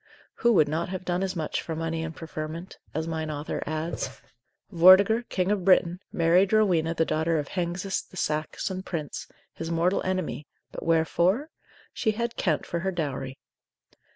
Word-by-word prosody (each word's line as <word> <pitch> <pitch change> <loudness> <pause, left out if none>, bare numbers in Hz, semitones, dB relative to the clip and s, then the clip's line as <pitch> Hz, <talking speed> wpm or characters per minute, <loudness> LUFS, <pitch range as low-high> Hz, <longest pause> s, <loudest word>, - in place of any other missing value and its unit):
Who 235 - +3
would 155 -7 +5
not 160 +4 -2
have 185 0 -5
done 180 0 0
as 190 -1 -2
much 160 -3 -2
for 165 - -5
money 165 0 -2
and 160 -1 -5
preferment? 160 +2 -6
as 160 +2 -3
mine 160 -1 -3
author 150 0 -4
adds. 155 +2 -2 0.6
Vortiger, 190 +6 +7
King 185 +1 0
of 205 -3 0
Britain, 180 -1 +4
married 175 +4 +3
Rowena 175 -7 +3
the 165 - +2
daughter 160 +1 +1
of 145 -2 -3
Hengist 180 +2 -2
the 185 - -12
Saxon 155 +4 -2
prince, 165 -6 -5 0.3
his 165 - -5
mortal 170 +3 +1
enemy; 185 -5 -2 0.2
but - - -7
wherefore? 170 - +2 0.4
she 220 - 0
had 235 +2 -2
Kent 160 -6 0
for 170 - -2
her 190 +3 -1
dowry. 135 -6 -3
170 Hz, 165 wpm, -27 LUFS, 160-185 Hz, 0.6 s, Vortiger